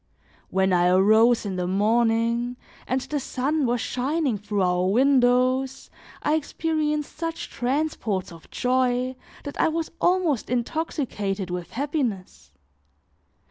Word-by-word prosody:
When 190 0 +2
I 175 0 +4
arose 220 +6 +4
in 190 -2 -3
the 180 -1 -1
morning, 230 +4 +1 0.3
and 260 +1 0
the 290 +3 -3
sun 280 +2 -1
was 240 -1 0
shining 270 0 -1
through 205 -1 -1
our 180 0 +1
windows, 255 +2 +2 0.3
I 300 - +2
experienced 305 -1 -1
such 330 0 -4
transports 245 - -2
of 165 -1 -14
joy 255 0 0 0.3
that 285 - -3
I - - +4
was 320 0 -2
almost 350 -8 +1
intoxicated 235 - -2
with 180 -1 -5
happiness. 225 - -3
245 Hz, 120 wpm, -24 LUFS, 205-285 Hz, 0.3 s, I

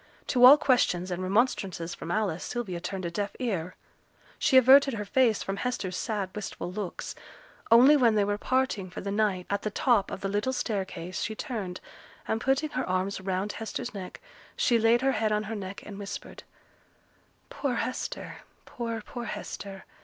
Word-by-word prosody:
To 250 -2 +3
all 275 +4 +11
questions 185 -10 +2
and 180 +1 -2
remonstrances 190 -4 0
from 165 - -8
Alice, 190 -3 -1
Sylvia 220 -8 -4
turned 185 +1 -4
a 170 - -3
deaf 205 +3 -3
ear. 185 -8 -3 0.6
She 265 - +4
averted 270 +1 +7
her 210 -1 -4
face 230 0 +2
from 195 0 -3
Hester's 200 -7 -2
sad, 200 -3 -2
wistful 200 -3 -5
looks; 195 -1 -5 0.6
only 250 +6 +8
when 240 -6 +4
they 210 - +3
were 205 +1 -1
parting 255 -8 0
for 180 - -7
the 200 - -4
night, 200 -3 0
at 200 - 0
the 215 - -2
top 210 -2 +2
of - - -6
the 195 - -1
little 205 +6 -1
staircase, 190 -7 -3
she 220 - -2
turned, 205 -7 -5 0.5
and 220 0 -1
putting 270 +4 +1
her 255 - -2
arms 185 +1 -1
round 190 +2 -2
Hester's 220 0 -5
neck 190 -3 -7 0.4
she 235 -2 +3
laid 230 +3 +4
her 270 - +4
head 215 -3 0
on 210 0 +1
her 220 +1 -5
neck, 195 -1 -7
and 205 -1 -8
whispered, 200 -1 -7 1.1
'Poor 275 -4 -2
Hester 255 +2 -4 0.3
poor, 230 -2 -4
poor 240 -1 -6
Hester! 195 -3 -7
210 Hz, 175 wpm, -28 LUFS, 190-240 Hz, 1.1 s, all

